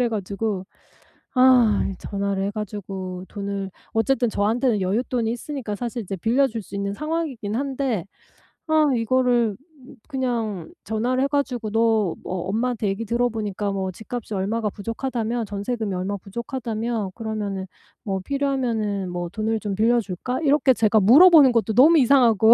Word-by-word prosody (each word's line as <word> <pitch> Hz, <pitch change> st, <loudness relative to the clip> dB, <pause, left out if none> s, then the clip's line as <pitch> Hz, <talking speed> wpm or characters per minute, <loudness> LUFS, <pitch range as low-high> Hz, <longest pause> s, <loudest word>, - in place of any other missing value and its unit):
그래 245 Hz, -, +3 dB
가지고 200 Hz, -2 st, -3 dB, 0.7 s
아 250 Hz, -5 st, +5 dB
이 190 Hz, -, -7 dB
전화를 200 Hz, -1 st, -2 dB
해 200 Hz, -, -1 dB
가지고 190 Hz, -3 st, -6 dB
돈을 200 Hz, -1 st, -4 dB, 0.2 s
어쨌든 245 Hz, +2 st, +1 dB
저한테는 225 Hz, +3 st, +1 dB
여윳돈이 225 Hz, +5 st, -1 dB
있으니까 240 Hz, -1 st, -4 dB
사실 240 Hz, +2 st, -4 dB
이제 195 Hz, -1 st, -5 dB
빌려 240 Hz, +9 st, +2 dB
줄 225 Hz, -4 st, -5 dB
수 195 Hz, -, -9 dB
있는 200 Hz, 0 st, -2 dB
상황이기는 290 Hz, -7 st, -3 dB
한데 265 Hz, -8 st, -2 dB, 0.6 s
아 310 Hz, -1 st, +4 dB
이거를 240 Hz, -2 st, +2 dB, 0.5 s
그냥 230 Hz, -, -2 dB
전화를 245 Hz, +4 st, 0 dB
해 -, -, +2 dB
가지고 270 Hz, -6 st, -1 dB
"너 225 Hz, -4 st, +2 dB
뭐 185 Hz, -1 st, -3 dB
엄마한테 225 Hz, 0 st, -1 dB
얘기 200 Hz, +4 st, -2 dB
들어보니까 215 Hz, -3 st, -1 dB
뭐 190 Hz, -1 st, -2 dB
집값이 220 Hz, +3 st, -7 dB
얼마가 210 Hz, +3 st, -1 dB
부족하다며? 230 Hz, +2 st, -3 dB
전세금이 205 Hz, +1 st, -3 dB
얼마가 190 Hz, +3 st, -2 dB
부족하다며? 225 Hz, -1 st, -3 dB
그러면은 210 Hz, -4 st, -4 dB, 0.4 s
뭐 195 Hz, -2 st, -2 dB
필요하면은 230 Hz, -6 st, -1 dB
뭐 175 Hz, -1 st, -4 dB
돈을 220 Hz, +3 st, -1 dB
좀 205 Hz, -2 st, -3 dB
빌려 235 Hz, +3 st, +3 dB
줄까?" 215 Hz, +5 st, -4 dB
이렇게 290 Hz, -3 st, +4 dB
제가 220 Hz, -1 st, +3 dB
물어 265 Hz, -, +8 dB
보는 300 Hz, -7 st, +7 dB
것도 225 Hz, -1 st, +1 dB
너무 305 Hz, +8 st, +7 dB
이상하고 235 Hz, -4 st, +5 dB
225 Hz, 355 characters per minute, -23 LUFS, 200-250 Hz, 0.7 s, 물어